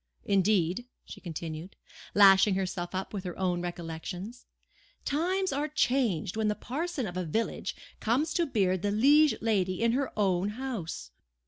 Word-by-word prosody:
Indeed," 195 +2 +2 0.2
she - - -10
continued, 165 0 -6 0.4
lashing 195 0 +7
herself 185 -1 -3
up 190 +3 -4
with 195 -3 -4
her 180 -2 -6
own 180 -2 0
recollections, 175 +6 -6 0.6
"times 365 +4 0
are 290 +2 0
changed 245 - +1
when 220 -1 0
the 210 - +1
parson 300 +2 -3
of 180 -3 -5
a 185 - -1
village 220 +8 -2 0.2
comes 280 +8 +1
to 340 -2 +1
beard 190 -7 +1
the 205 - 0
liege 285 +8 +5
lady 190 -5 +1
in 230 - +4
her 265 +2 0
own 190 -1 +2
house. 200 - -5
200 Hz, 150 wpm, -29 LUFS, 180-255 Hz, 0.6 s, lashing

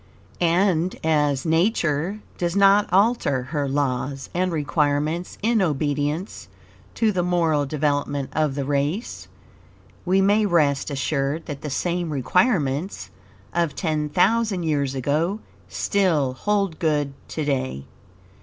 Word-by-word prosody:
And 175 0 +2
as 150 -3 +1
Nature 170 +1 +1 0.2
does 175 0 -1
not 200 +1 +4
alter 195 - +2
her 145 +1 -2
laws 135 -1 -2
and 185 +1 0
requirements 150 +2 -1
in 225 -1 +2
obedience 150 +2 -1 0.5
to 225 -2 +2
the 185 -3 0
moral 165 -5 +1
development 145 -1 -1
of 155 -3 0
the 140 -1 -2
race, 145 - -2 0.8
we 185 +2 +2
may 205 +3 +3
rest 150 -7 +2
assured 140 +2 -2
that 145 -2 -6
the 150 - -5
same 175 +4 -1
requirements, 155 - 0 0.4
of 170 -3 0
ten 155 -3 -1
thousand 205 +2 +2
years 140 -4 0
ago, 155 - 0 0.3
still 165 -10 +1
hold 195 +2 -1
good 150 -4 0
to 155 - -4
day. 130 - -2
155 Hz, 120 wpm, -23 LUFS, 145-185 Hz, 0.8 s, not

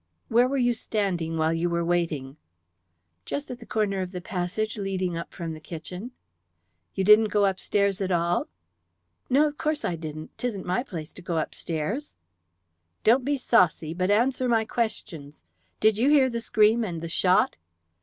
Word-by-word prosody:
"Where 240 +2 +4
were 275 +2 -1
you 245 -2 +3
standing 185 -8 -2
while 160 0 +2
you 165 +1 0
were 170 0 0
waiting?" 160 -6 -1 0.9
"Just 285 - -4
at 250 - -7
the 230 - -13
corner 205 -4 0
of 185 0 -5
the 180 - -4
passage 195 +3 -3
leading 190 -3 -2
up 170 - -5
from 165 -3 -5
the 155 - -8
kitchen." 180 +7 -7 0.9
"You 190 - 0
didn't 210 +3 +7
go 205 -1 +2
up 190 -1 0
stairs 200 -1 0
at 190 - -1
all?" 170 0 +1 0.8
"No, 285 +4 +5
of 295 -1 -3
course 310 -1 0
I 175 - -1
didn't. 155 -1 -8
'Tisn't 225 -6 -3
my 180 +5 0
place 165 - -7
to - - -12
go 175 -2 -3
upstairs." 170 - -3 0.9
"Don't 245 +4 +5
be 285 +2 0
saucy, 180 - +2
but 185 +2 -1
answer 250 +4 +2
my 225 -2 +3
questions. 175 - -3 0.4
Did 215 0 +3
you 260 +5 +4
hear 275 -4 +5
the 235 0 -3
scream 220 +1 +3
and 170 -6 -4
the 170 - -4
shot?" 180 +2 +2
195 Hz, 175 wpm, -26 LUFS, 170-230 Hz, 0.9 s, didn't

